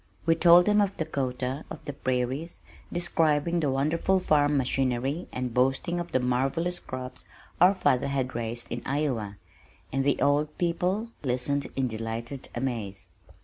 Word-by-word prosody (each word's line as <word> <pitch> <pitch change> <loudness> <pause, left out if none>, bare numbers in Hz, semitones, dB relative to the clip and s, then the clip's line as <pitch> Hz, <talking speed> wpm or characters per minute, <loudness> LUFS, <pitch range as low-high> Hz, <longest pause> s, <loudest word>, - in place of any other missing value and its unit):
We 165 - +5
told 170 +1 +7
them 210 0 +4
of 200 -1 0
Dakota, 135 -3 -2
of - - -9
the 145 - -4
prairies, 130 +5 -2 0.3
describing 170 -1 +1
the 150 -4 +1
wonderful 155 +8 +1
farm 145 -4 +3
machinery, 135 +4 0
and 125 -2 -3
boasting 135 +8 +1
of 175 0 -5
the 130 - +2
marvellous 135 +8 0
crops 130 0 -7 0.4
our 185 +3 +7
father 140 -7 +2
had 135 -2 -1
raised 120 0 -3
in 120 +1 -3
Iowa, 125 -9 -2 0.6
and 135 0 +1
the 140 0 +2
old 150 +1 +1
people 180 +6 0
listened 140 +2 0
in 135 -1 +1
delighted 115 +3 -5
amaze. 115 -6 -3
135 Hz, 145 wpm, -27 LUFS, 125-165 Hz, 0.6 s, told